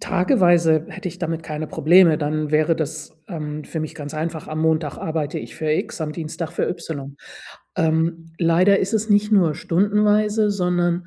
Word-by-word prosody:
Tageweise 175 - +3
hätte - - -6
ich 180 - -11
damit 165 -2 -3
keine 155 0 -5
Probleme, 165 +1 +4
dann 150 0 -2
wäre 155 +1 +2
das, 155 0 -5
ähm, 150 -3 -5
für 160 - -5
mich 155 - -5
ganz 145 -1 -7
einfach. 160 +1 -4
Am 155 0 -3
Montag 160 -2 0
arbeite 155 -2 -3
ich - - -9
für 155 -1 -2
X, 155 - -2
am 155 -1 -3
Dienstag 160 +1 -5
für - - -1
Y. 140 -5 -6 0.6
Ähm, 165 +1 0
leider 180 +4 +4
ist 195 +3 -1
es 220 0 0
nicht 210 +1 +3
nur 175 -7 +4
stundenweise, 210 +5 +2
sondern, 175 -2 0
165 Hz, 175 wpm, -21 LUFS, 155-180 Hz, 0.6 s, Probleme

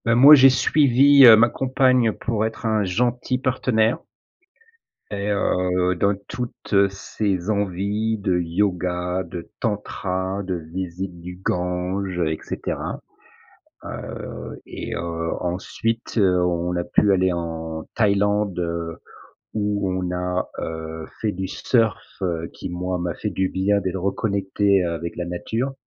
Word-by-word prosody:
Beh, 115 0 +3
moi, 140 +5 +9
j'ai 135 -1 +8
suivi, 140 +1 +6
heu, 115 - +11
ma 115 +2 +5
compagne 130 -3 +2
pour 110 +1 -2
être 110 - -8
un 110 -1 +2
gentil 120 +6 0
partenaire 125 -3 +1 1.1
et 100 0 -3
heu, 90 -2 +1
dans 100 +3 +2
toutes 110 -4 0
ses 100 -1 -3
envies 105 +2 0
de 95 -3 +1
Yoga, 90 0 -1
de 85 -2 -8
Tantra, 95 -3 -2
de 95 -1 -2 0.2
visite 90 0 -5
du 90 +1 -8
Gange, 90 +1 -2
heu, 80 -3 +1
et 80 - -3
cetera. - - -4 0.8
Heu, - - -7
et, - - -6
heu, 85 -1 -3
ensuite, 110 +7 -3
heu, 90 -3 +3
on 90 0 -1
a 85 - -1
pu 105 - +3
aller 95 -1 +3
en 80 -2 -4
Thaïlande, 105 -2 +1
heu, 85 -1 -3 0.6
où 105 -2 -1
on 90 -1 -2
a, 90 0 -2
heu, 80 0 -5 0.2
fait 105 -2 0
du 95 +1 -4
surf, 115 +2 +1 0.2
heu, 85 -2 -2
qui, - - -7
moi, 90 +1 -2
m'a 85 -1 -2
fait - - -4
du 95 -1 -1
bien, 100 +2 +1
d'être 95 -1 -3
reconnecté, 100 -1 +1
heu, 85 -1 -1
avec 85 +1 -5
la 90 - -2
nature. 110 +9 -3
95 Hz, 140 wpm, -22 LUFS, 90-110 Hz, 1.1 s, heu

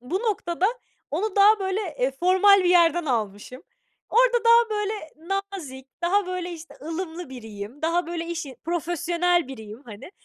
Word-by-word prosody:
Bu 255 +10 -2
noktada 380 -5 0 0.4
onu 380 +7 -2
daha, 420 +2 +6
böyle, 380 +1 -1 0.2
eee, 255 +2 +1
formal 375 +3 +6
bir 355 - +3
yerden 345 -1 +4
almışım. 225 +1 -3 0.5
Orada 485 0 +3
daha, 465 0 +6
böyle, 420 0 -1 0.6
nazik, 265 -8 -8 0.2
daha, 385 +3 +2
böyle, 365 -1 -4
işte, 335 0 -11
ılımlı 330 0 -5
biriyim, 225 +1 -9
daha 335 +2 +1
böyle 335 0 -4
işi 330 -7 -5
profesyonel 345 0 0
biriyim, 220 -2 -9
hani. 215 - -11
345 Hz, 145 wpm, -24 LUFS, 270-380 Hz, 0.6 s, daha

